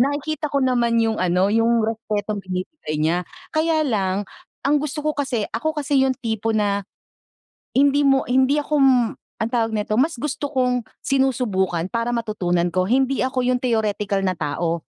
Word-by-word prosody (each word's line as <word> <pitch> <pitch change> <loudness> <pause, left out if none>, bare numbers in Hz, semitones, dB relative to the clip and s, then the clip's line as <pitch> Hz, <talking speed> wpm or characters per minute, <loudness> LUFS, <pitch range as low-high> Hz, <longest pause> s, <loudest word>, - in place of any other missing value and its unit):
nakikita 290 +3 0
ko 280 -2 0
naman 240 -2 +2
yung 225 -1 0
ano, 185 +2 +2
yung 230 0 +3
respetong 215 -2 -2
binibigay 185 - -5
niya. 170 +3 +1 0.3
Kaya 315 0 +2
lang, 200 -5 0 0.4
ang 290 +1 +3
gusto 300 +1 -4
ko 305 0 0
kasi 265 -7 -1
ako 310 +8 -2
kasi 285 -2 +1
yung 260 - 0
tipo 225 -3 -2
na 200 -2 0 0.9
hindi 285 +2 +4
mo 270 -1 +3
hindi 265 +3 +3
ako 300 +1 -2
m 270 -1 +6 0.5
anong 230 +3 -3
tawag 225 -2 +2
nito, 210 0 -1
mas 310 -2 0
gusto 285 +1 -3
kong 250 -3 +1 0.2
sinusubukan, 220 -11 +1
para 230 +1 0
matutunan 180 -7 -1
ko. 185 +1 +1
Hindi 265 +2 +2
ako 255 -1 0
yung 250 0 +1
theoretical 210 -4 0
na 185 - +1
tao. 165 +1 -2
235 Hz, 165 wpm, -22 LUFS, 205-275 Hz, 0.9 s, m